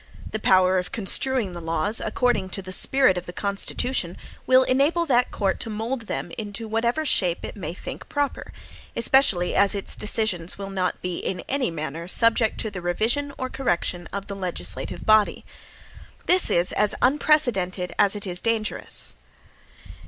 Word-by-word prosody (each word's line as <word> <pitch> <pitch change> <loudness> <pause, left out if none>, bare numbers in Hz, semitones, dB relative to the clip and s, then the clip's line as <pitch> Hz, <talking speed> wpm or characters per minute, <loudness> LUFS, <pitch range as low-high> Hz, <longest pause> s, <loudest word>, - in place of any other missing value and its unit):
The 220 - -3
power 185 -2 +4
of 180 - -6
construing 230 +1 0
the 175 -1 -8
laws 165 +6 -1
according 245 -6 0
to 195 - -6
the 185 - -7
spirit 255 -1 +4
of 180 - -14
the - - -5
Constitution, 200 +1 -1 0.3
will 260 0 +6
enable 285 +7 +2
that 250 -4 +2
court 195 -2 -1
to 230 - -3
mould 225 +2 -4
them 135 +5 -4
into 215 +1 -5
whatever 235 +7 0
shape 180 - +1
it - - -8
may 170 -4 -6
think - - -8
proper; 290 -1 -2 0.4
especially 235 -8 +3
as 200 +1 +3
its 200 - 0
decisions 205 -5 0
will 195 0 -6
not 185 -2 -2
be 180 -1 -3
in 180 -2 -3
any 270 -2 0
manner 165 +1 -5
subject 225 +3 +2
to 220 - -4
the 185 -2 -6
revision 225 +11 0
or 260 - -3
correction 175 -9 -2
of 200 0 -5
the 200 - -6
legislative 135 - -4
body. 215 -1 +3 0.8
This 365 0 +4
is 175 +1 +3
as 210 -1 +2
unprecedented 245 -10 +2
as 200 0 +4
it 205 - -3
is 180 -1 +1
dangerous. 225 -2 -1
200 Hz, 165 wpm, -24 LUFS, 180-245 Hz, 0.8 s, will